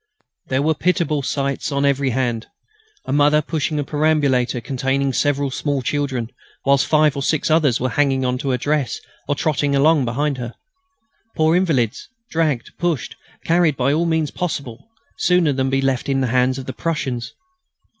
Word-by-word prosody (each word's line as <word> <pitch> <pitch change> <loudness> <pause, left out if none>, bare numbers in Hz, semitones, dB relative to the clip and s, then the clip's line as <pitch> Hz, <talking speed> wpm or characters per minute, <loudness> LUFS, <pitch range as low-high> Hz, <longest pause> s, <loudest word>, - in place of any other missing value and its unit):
There 130 +1 0
were 160 +1 +3
pitiable 170 -3 0
sights 140 +1 -2
on 140 0 +1
every 140 -1 +2
hand. 120 -2 -1 0.6
A 130 - -2
mother 145 +1 +4
pushing 155 0 -2
a 145 - 0
perambulator 145 -5 +1
containing 135 +2 -1
several 145 -1 0
small 140 0 -2
children, 135 -5 -2 0.4
whilst 140 -1 +3
five 155 -2 +3
or 140 - -3
six 155 +3 0
others 150 -7 +3
were 130 - 0
hanging 135 -2 +1
on 125 0 -1
to 140 0 -3
her 130 - +1
dress 145 -2 -1 0.3
or 145 - 0
trotting 145 -1 0
along 140 -2 +3
around 140 +2 -1
her. 120 -1 -6 0.8
Poor 160 +1 +3
invalids, 140 - 0 0.2
dragged, 155 -7 0
pushed, 170 -8 -1 0.3
carried 165 -3 +3
by 135 +2 +2
all 170 +3 +1 0.3
possible 140 -9 -3
means, 225 0 -14
sooner 180 -5 +3
than 130 0 0
be 135 0 0
left 135 0 0
in 135 -1 +1
the 130 - +1
hands 130 +1 +2
of 135 - -6
the 130 - -5
Prussians. 130 -8 -3
140 Hz, 170 wpm, -20 LUFS, 130-155 Hz, 0.8 s, mother